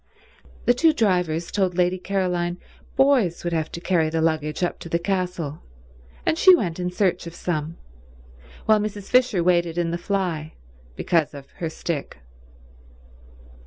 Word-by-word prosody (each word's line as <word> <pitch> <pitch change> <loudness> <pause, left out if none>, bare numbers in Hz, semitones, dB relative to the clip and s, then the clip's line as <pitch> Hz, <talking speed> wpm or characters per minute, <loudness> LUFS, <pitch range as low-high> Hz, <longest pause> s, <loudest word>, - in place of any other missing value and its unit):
The 245 - +5
two 315 +6 +4
drivers 180 - 0
told 190 -3 0
Lady 180 +1 +2
Caroline 180 -2 -1 0.4
boys 265 -11 +3
would 175 -1 -2
have 160 -2 -1
to - - -4
carry 170 -3 +1
the 165 +1 -1
luggage 155 0 0
up 175 - -1
to 170 - -9
the 170 - +1
castle, 180 -4 -2 0.6
and 320 - +1
she 375 -1 +8
went 180 - -2
in 180 0 -1
search 180 -2 0
of 170 - -9
some, 160 -2 -3 0.9
while 215 -1 +5
Mrs. 205 -1 -4
Fisher 250 -8 +3
waited 175 -1 +2
in 170 -1 0
the 170 - -2
fly 175 -5 -2 0.4
because 165 - 0
of 140 -1 -11
her 165 - -3
stick. 160 -2 -4
175 Hz, 155 wpm, -23 LUFS, 165-195 Hz, 0.9 s, she